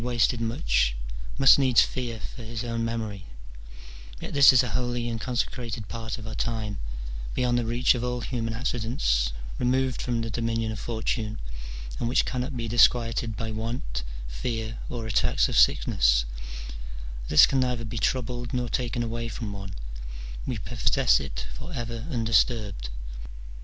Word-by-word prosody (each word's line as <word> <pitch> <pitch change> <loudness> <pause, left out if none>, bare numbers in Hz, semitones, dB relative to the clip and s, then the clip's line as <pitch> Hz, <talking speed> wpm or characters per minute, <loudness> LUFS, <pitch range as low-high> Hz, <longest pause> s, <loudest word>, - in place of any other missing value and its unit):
303 120 +1 -2
wasted 120 0 +3
much, - - +1 0.4
must 135 0 +8
needs 130 -4 +6
fear 120 -3 -3 0.2
his 115 -1 -5
own 115 -1 -2
memory; 110 -4 -3 0.9
yet - - -6
this 140 -2 +9
is 130 -1 +5
a 125 - -2
holy 120 +2 -1
and 115 -1 -3
consecrated 120 -3 -2
part 115 +2 -4
of 115 - -9
our 110 - -5
time, 110 -3 -2 0.6
beyond 125 -1 +2
the 120 -2 +1
reach 120 +2 +4
of 120 -2 -3
all 125 0 -1
human 115 -3 -2
accidents, 110 - 0 0.3
removed 130 +1 +1
from 120 -2 -1
the 115 0 -3
dominion 115 -1 -1
of 110 - -5
Fortune, 110 0 -2 0.6
and 115 - 0
which 125 - +3
cannot 125 +1 -2
be 115 -1 -2
disquieted 115 -1 +3
by 115 -1 -3
want, 110 - -3 0.3
fear, 110 - -3
or 115 -2 -4
attacks 110 -2 +2
of - - -3
sickness: - - +4 1.0
this 75 - +8
can 135 - +1
neither 125 -2 0
be 115 +1 -4
troubled 120 0 -1
nor 125 -1 -1
taken 120 -1 -1
away 115 0 -3
from 110 -2 -5
one: 100 -1 -6 0.7
we 125 - -1
possess 115 +4 +2
it - - -5
for 155 +5 -7
ever 115 -1 -4
undisturbed. 110 - +1
115 Hz, 155 wpm, -27 LUFS, 110-125 Hz, 1.0 s, this